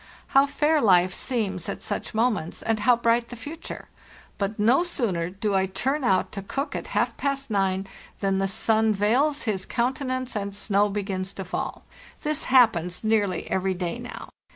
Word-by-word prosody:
How 275 Hz, +1 st, +5 dB
fair 300 Hz, +2 st, +2 dB
life 185 Hz, -4 st, +4 dB
seems 195 Hz, -9 st, -1 dB
at -, -, -5 dB
such -, -, -4 dB
moments, 220 Hz, -8 st, 0 dB
and 225 Hz, -1 st, 0 dB
how 245 Hz, +3 st, +5 dB
bright 235 Hz, 0 st, +1 dB
the 245 Hz, -, -7 dB
future! 300 Hz, +7 st, -8 dB, 0.5 s
But 200 Hz, +1 st, -1 dB
no 235 Hz, +10 st, +4 dB
sooner 200 Hz, -, -1 dB
do 200 Hz, +2 st, -2 dB
I 190 Hz, 0 st, +2 dB
turn 265 Hz, +10 st, -1 dB
out 190 Hz, -6 st, +2 dB
to 200 Hz, -, -5 dB
cook 275 Hz, +9 st, -4 dB
at -, -, -4 dB
half -, -, +1 dB
past 275 Hz, -3 st, -2 dB
nine 195 Hz, -1 st, +1 dB, 0.3 s
than 195 Hz, -1 st, +1 dB
the 195 Hz, -, +1 dB
sun 220 Hz, +2 st, +2 dB
veils 260 Hz, +9 st, +2 dB
his 195 Hz, -4 st, -2 dB
counte 255 Hz, +4 st, -1 dB
nance 255 Hz, -2 st, -3 dB
and 200 Hz, -1 st, -3 dB
snow 205 Hz, 0 st, +2 dB
begins 195 Hz, -2 st, -3 dB
to 195 Hz, -, -6 dB
fall. 180 Hz, -, -4 dB, 0.4 s
This 300 Hz, -1 st, -1 dB
happens 220 Hz, -10 st, +3 dB
nearly 205 Hz, -5 st, +1 dB
every 190 Hz, 0 st, 0 dB
day 175 Hz, -2 st, -3 dB
now. -, -, -8 dB
215 Hz, 175 wpm, -25 LUFS, 190-255 Hz, 0.5 s, How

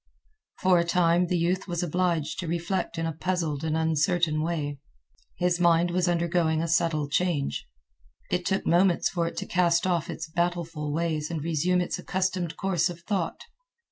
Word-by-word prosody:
For 185 Hz, -2 st, +5 dB
a -, -, +3 dB
time 170 Hz, 0 st, +2 dB
the 180 Hz, -, +1 dB
youth 180 Hz, +3 st, 0 dB
was 175 Hz, -1 st, -2 dB
obliged 170 Hz, -2 st, 0 dB
to 180 Hz, -, -3 dB
reflect 170 Hz, +2 st, -2 dB
in 165 Hz, -, -1 dB
a 165 Hz, -, -2 dB
puzzled 165 Hz, -3 st, -2 dB
and 160 Hz, 0 st, 0 dB
uncertain 160 Hz, 0 st, +1 dB
way. 150 Hz, -4 st, -2 dB, 0.6 s
His 180 Hz, 0 st, +1 dB
mind 170 Hz, 0 st, +4 dB
was 180 Hz, 0 st, +1 dB
undergoing 170 Hz, -2 st, +1 dB
a 165 Hz, -, -1 dB
subtle 165 Hz, -3 st, +1 dB
change. 150 Hz, -1 st, -1 dB, 0.6 s
It 180 Hz, 0 st, 0 dB
took 190 Hz, +3 st, -1 dB
moments 175 Hz, +1 st, +3 dB
for 170 Hz, -2 st, -1 dB
it -, -, -6 dB
to -, -, -2 dB
cast 170 Hz, -1 st, +2 dB
off 175 Hz, -4 st, 0 dB
its -, -, -5 dB
battleful 165 Hz, -2 st, -2 dB
ways 155 Hz, -1 st, -1 dB
and 160 Hz, -4 st, -3 dB
resume 170 Hz, +3 st, +1 dB
its 175 Hz, -, -3 dB
accustomed 185 Hz, -3 st, -2 dB
course 180 Hz, -3 st, +1 dB
of 170 Hz, -1 st, -8 dB
thought. 185 Hz, -2 st, -2 dB
170 Hz, 170 wpm, -27 LUFS, 160-180 Hz, 0.6 s, For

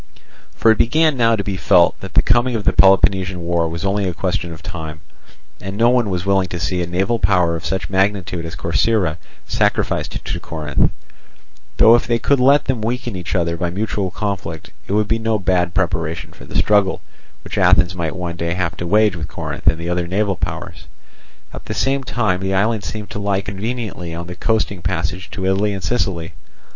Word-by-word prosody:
For 115 Hz, -, +4 dB
it 110 Hz, -, +1 dB
began 155 Hz, +5 st, +3 dB
now 115 Hz, -2 st, +3 dB
to 100 Hz, -, -3 dB
be 100 Hz, -1 st, -3 dB
felt 90 Hz, +1 st, +4 dB
that 95 Hz, -2 st, -10 dB
the -, -, +5 dB
coming 120 Hz, +2 st, +2 dB
of 110 Hz, -, -2 dB
the -, -, +2 dB
Peloponnesian 95 Hz, -1 st, +4 dB
war 85 Hz, -1 st, 0 dB
was 85 Hz, +3 st, -4 dB
only 100 Hz, 0 st, 0 dB
a 90 Hz, -, -5 dB
question 85 Hz, -2 st, -2 dB
of 80 Hz, +2 st, -10 dB
time, 80 Hz, -5 st, -6 dB, 0.6 s
and 95 Hz, +1 st, -6 dB
no 120 Hz, +2 st, +4 dB
one 120 Hz, -4 st, +2 dB
was 90 Hz, -1 st, -2 dB
willing 95 Hz, -1 st, +2 dB
to 90 Hz, 0 st, -5 dB
see 90 Hz, +2 st, -1 dB
a 85 Hz, -, -2 dB
naval 95 Hz, +7 st, 0 dB
power 90 Hz, -4 st, +2 dB
of 85 Hz, -, -6 dB
such 95 Hz, 0 st, -2 dB
magnitude 95 Hz, -3 st, 0 dB
as 80 Hz, +1 st, -6 dB
Corcyra 90 Hz, -1 st, +1 dB, 0.3 s
sacrificed -, -, -1 dB
to -, -, -3 dB
Corinth; 75 Hz, -3 st, 0 dB, 0.9 s
though 110 Hz, -, +7 dB
if 120 Hz, -, +3 dB
they 120 Hz, -1 st, +2 dB
could 140 Hz, +3 st, +2 dB
let 140 Hz, +3 st, +5 dB
them 130 Hz, -4 st, -1 dB
weaken 120 Hz, 0 st, -3 dB
each 90 Hz, +2 st, -4 dB
other 85 Hz, -2 st, 0 dB
by 85 Hz, +1 st, -2 dB
mutual 100 Hz, +1 st, -2 dB
conflict, 95 Hz, -5 st, -4 dB, 0.2 s
it -, -, -2 dB
would 105 Hz, 0 st, +2 dB
be 115 Hz, +1 st, +1 dB
no 110 Hz, -1 st, 0 dB
bad 90 Hz, -3 st, 0 dB
preparation 85 Hz, -5 st, -1 dB
for -, -, -13 dB
the -, -, -11 dB
struggle 100 Hz, -2 st, +2 dB, 0.4 s
which -, -, -4 dB
Athens 90 Hz, 0 st, +4 dB
might 85 Hz, -2 st, -3 dB
one 90 Hz, -2 st, -4 dB
day 85 Hz, +1 st, -2 dB
have 90 Hz, -3 st, -1 dB
to 85 Hz, -, -4 dB
wage 105 Hz, +1 st, +3 dB
with 80 Hz, -3 st, -5 dB
Corinth -, -, -6 dB
and 80 Hz, -1 st, +5 dB
the 85 Hz, +1 st, -5 dB
other 90 Hz, 0 st, -1 dB
naval 95 Hz, +2 st, 0 dB
powers. -, -, -6 dB, 0.7 s
At -, -, -9 dB
the -, -, -4 dB
same 135 Hz, 0 st, 0 dB
time 110 Hz, -8 st, 0 dB
the 95 Hz, 0 st, -1 dB
island 110 Hz, +2 st, +1 dB
seemed 105 Hz, 0 st, -6 dB
to 105 Hz, -, -5 dB
lie 100 Hz, -1 st, 0 dB
conveniently 100 Hz, -4 st, -5 dB
on 85 Hz, +1 st, -5 dB
the 90 Hz, +1 st, -8 dB
coasting 105 Hz, -2 st, -1 dB
passage 85 Hz, +2 st, -3 dB
to 95 Hz, -, -5 dB
Italy 100 Hz, +2 st, +1 dB
and 95 Hz, -, -7 dB
Sicily. 90 Hz, -5 st, -1 dB
95 Hz, 205 wpm, -19 LUFS, 85-105 Hz, 0.9 s, though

